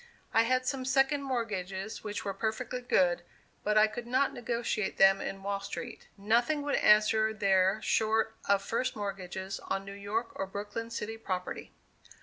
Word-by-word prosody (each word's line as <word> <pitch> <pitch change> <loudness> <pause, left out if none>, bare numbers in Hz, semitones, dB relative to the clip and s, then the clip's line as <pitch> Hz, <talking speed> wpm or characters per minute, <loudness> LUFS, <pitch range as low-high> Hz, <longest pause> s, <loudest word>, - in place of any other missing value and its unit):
I 225 0 +5
had 255 0 +2
some 265 0 -1
second 270 +2 +2
mortgages 215 -6 -3
which 210 -1 -4
were 200 - -1
perfectly 225 +5 -3
good, 180 -7 +2 0.4
but 210 +1 +2
I 215 - +8
could 235 +2 -6
not 260 +3 +2
negotiate 235 -3 -2
them 195 0 +6
in 195 0 -5
Wall 200 0 -1
Street. 235 +4 -7
Nothing 240 +9 +2
would 290 -1 -1
answer 215 0 +4
there 195 -1 +3
short 220 0 +1
of 200 0 +4
first 240 +3 -1
mortgages 190 -2 -5
on 195 0 -3
New 195 - -7
York 205 +4 -3
or 195 - -3
Brooklyn 205 +3 -5
city 225 -1 -4
property. 185 -4 -4
215 Hz, 160 wpm, -30 LUFS, 195-235 Hz, 0.4 s, I